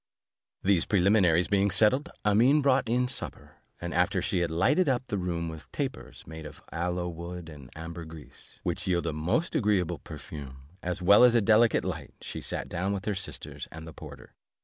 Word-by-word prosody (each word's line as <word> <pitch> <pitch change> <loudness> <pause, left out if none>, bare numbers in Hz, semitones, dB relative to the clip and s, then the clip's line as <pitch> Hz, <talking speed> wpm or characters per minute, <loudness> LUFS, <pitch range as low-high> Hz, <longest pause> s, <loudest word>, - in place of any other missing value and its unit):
These 95 -3 +3
preliminaries 90 -3 +4
being 100 0 +2
settled, 130 - +3 0.2
Amene 120 +8 +4
brought 130 -4 +3
in 125 +2 +2
supper, 125 - -5 0.2
and 85 0 -4
after 95 +2 +2
she 90 +1 0
had 85 -1 0
lighted 130 - +2
up 130 -1 0
the 105 - -3
room 85 -2 -2
with 80 -1 -9
tapers, 135 -2 -5
made 80 0 -9
of 75 -1 -10
aloe 90 +1 -2
wood 85 0 -7
and 70 -5 -11
ambergris, 80 -1 -9
which - - -2
yield 85 -2 +1
a 80 - -1
most 85 - 0
agreeable 95 - +1
perfume, 65 -3 -9 0.2
as 90 +1 -3
well 100 +6 +7
as 125 -1 +6
a - - +6
delicate 110 +2 +4
light, - - -5
she - - -7
sat - - -4
down 95 +3 -2
with 95 -2 -4
her 105 - 0
sisters 75 -7 -6
and 80 0 -9
the 80 - -9
porter. - - -11
90 Hz, 185 wpm, -28 LUFS, 80-105 Hz, 0.2 s, well